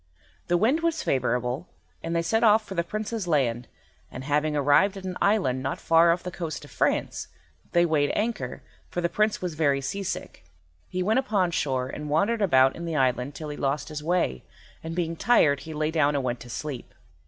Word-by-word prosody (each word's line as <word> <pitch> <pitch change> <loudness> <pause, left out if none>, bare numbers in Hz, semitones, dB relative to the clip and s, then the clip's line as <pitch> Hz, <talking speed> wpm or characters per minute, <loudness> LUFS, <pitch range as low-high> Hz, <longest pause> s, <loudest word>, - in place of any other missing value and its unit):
The 175 - +3
wind 240 - +3
was 330 -2 0
favourable, 125 +4 -1 0.3
and 165 0 -3
they 170 - +1
set 225 +7 +1
off 215 -1 +5
for 195 - -7
the 170 -2 0
Prince's 215 +2 -4
land, 125 -7 +1 0.4
and, 130 - -7
having 150 +2 0
arrived 145 +8 +3
at 190 - -8
an 185 -1 -4
island 185 -12 +2
not 130 - -3
far 165 +1 +5
off 170 +1 -1
the 180 - -5
coast 160 -5 -5
of 145 - -16
France, - - -1 0.5
they 175 0 +5
weighed 150 -3 +2
anchor, 215 - -2 0.3
for - - -3
the 170 -1 0
Prince 210 +2 0
was 180 -2 -2
very 145 -3 +2
sea 200 +9 -4
sick. 195 - -5 0.5
He 180 0 -2
went 220 +6 +3
upon 205 -9 +1
shore 130 -5 -1
and 150 +3 -6
wandered 205 +9 +1
about 135 -8 +4
in 170 - -6
the 165 -2 -3
island 130 0 +1
till 155 -1 -6
he 150 - -6
lost 140 +2 -1
his 150 -1 -5
way, 170 - 0 0.4
and 165 0 -5
being 165 -2 -1
tired 155 -9 +3
he 160 - -8
lay 155 +1 0
down 150 -3 +2
and 140 - 0
went 120 -1 -2
to 120 +1 -11
sleep. 135 +1 -6
160 Hz, 210 wpm, -26 LUFS, 140-190 Hz, 0.5 s, off